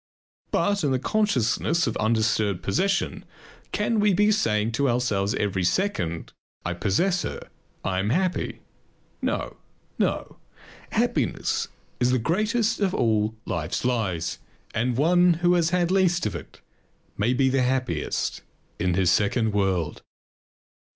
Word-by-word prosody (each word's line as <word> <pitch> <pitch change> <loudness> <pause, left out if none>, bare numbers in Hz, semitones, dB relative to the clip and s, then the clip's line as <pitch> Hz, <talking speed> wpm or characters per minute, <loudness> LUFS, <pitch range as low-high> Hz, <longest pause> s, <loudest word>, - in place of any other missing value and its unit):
But 200 -3 +1
in 145 - +2
the 130 - +2
consciousness 170 - +1
of 115 - -2
undisturbed 110 -3 +1
possession 195 - 0 0.5
can 210 +1 0
we 205 -2 +3
be 210 +3 +4
saying 110 - +1
to 135 +4 +1
ourselves 110 -5 0
every 95 -2 -1
second: 90 - -1 0.3
I 90 - -1
possess 115 - +1
her, - - -6 0.3
I 95 -1 0
am 100 +2 0
happy? 180 +7 -1 0.6
No! - - -2 0.4
no! - - -1 0.6
Happiness - - 0 0.3
is 125 - +3
the 130 - +3
greatest 215 - +1
of 195 -3 +1
all 110 -1 +1
life's 85 +7 -2
lies 105 -9 -1 0.3
and 120 +1 0
one 175 +4 +5
who 175 +2 +2
has 170 -2 +3
had 180 -1 +1
least 185 -5 +2
of 105 - -1
it 85 - -10 0.5
may 120 +5 +1
be 130 +1 +3
the 135 0 +2
happiest 125 - -1 0.4
in 90 0 +1
his 90 -1 +3
second 110 +2 +2
world. 95 -6 0
125 Hz, 135 wpm, -25 LUFS, -, 0.6 s, one